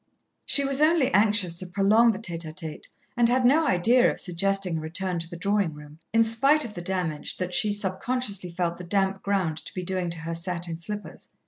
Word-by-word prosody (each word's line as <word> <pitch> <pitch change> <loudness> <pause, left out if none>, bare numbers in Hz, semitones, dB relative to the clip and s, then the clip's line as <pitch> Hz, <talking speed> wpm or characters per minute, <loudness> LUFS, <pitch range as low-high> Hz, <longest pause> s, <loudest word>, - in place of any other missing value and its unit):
She 280 - +2
was 275 +1 +1
only 310 -3 +3
anxious 205 -3 +3
to 185 - -3
prolong 205 +5 +3
the 205 - -5
tête 175 -6 -4
à 160 -2 -7
tête, 160 -3 -5 0.3
and 240 -1 +3
had 250 +1 +2
no 300 +5 +4
idea 235 +8 +3
of - - -4
suggesting 185 -1 0
a - - -7
return 175 +3 -1
to 165 0 -6
the 170 - -8
drawing 200 -3 0
room, 150 +1 -13
in 225 0 +4
spite 275 +7 +4
of 220 - -7
the 175 - -7
damage 175 -4 -3
that 180 -1 -4
she 210 +3 +2
subconsciously 205 0 -2
felt 170 0 -3
the - - -7
damp 195 +1 0
ground 190 -6 -1
to - - -8
be 185 - -4
doing 185 -1 -2
to 170 - -4
her 165 +1 -4
satin 170 -1 -4
slippers. 210 +4 -8
190 Hz, 215 wpm, -25 LUFS, 170-225 Hz, 0.3 s, no